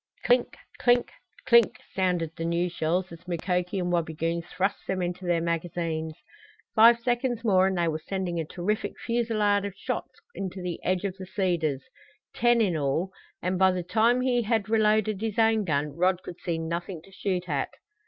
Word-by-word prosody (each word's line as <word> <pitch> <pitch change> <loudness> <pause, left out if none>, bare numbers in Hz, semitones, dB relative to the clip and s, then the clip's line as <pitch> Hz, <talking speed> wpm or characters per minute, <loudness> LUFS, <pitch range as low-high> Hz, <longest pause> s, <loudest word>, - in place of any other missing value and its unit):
Clink - - +2 0.2
clink 245 0 +3 0.3
clink 235 -2 +5
sounded 180 -4 0
the 165 - -4
new 170 +1 0
shells 175 +2 -1
as 170 +2 -12
Mukoki 180 +2 -1
and 180 -1 -1
Wabigoon 165 0 -1
thrust 185 +3 -2
them 190 - -1
into 180 +1 -3
their 170 -1 +2
magazines. 165 -1 -2 0.6
Five 230 +1 +7
seconds 240 0 -1
more 190 -4 +4
and 190 -1 -1
they 170 -1 +2
were 160 -1 -1
sending 185 -2 -2
a 160 - -2
terrific 190 +6 -2
fusillade 220 -4 +1
of 200 -1 -5
shots - - -5
into 190 -1 -5
the 180 -2 -5
edge 185 +1 0
of 190 -1 -3
the 190 -1 -8
cedars 170 -9 0 0.5
ten 240 0 +3
in 190 -6 +2
all 155 +5 0 0.3
and 180 +1 0
by 190 0 +6
the 185 -1 -1
time 230 +6 +3
he 250 -1 +2
had 220 -2 0
reloaded 215 -2 +2
his 220 -2 -3
own 225 -2 +3
gun 145 -3 -1
Rod 180 +1 +1
could 175 - -9
see 170 -3 -2
nothing 170 +1 -4
to 195 - -18
shoot 185 -2 -2
at. 140 -4 -1
185 Hz, 180 wpm, -27 LUFS, 170-215 Hz, 0.6 s, Five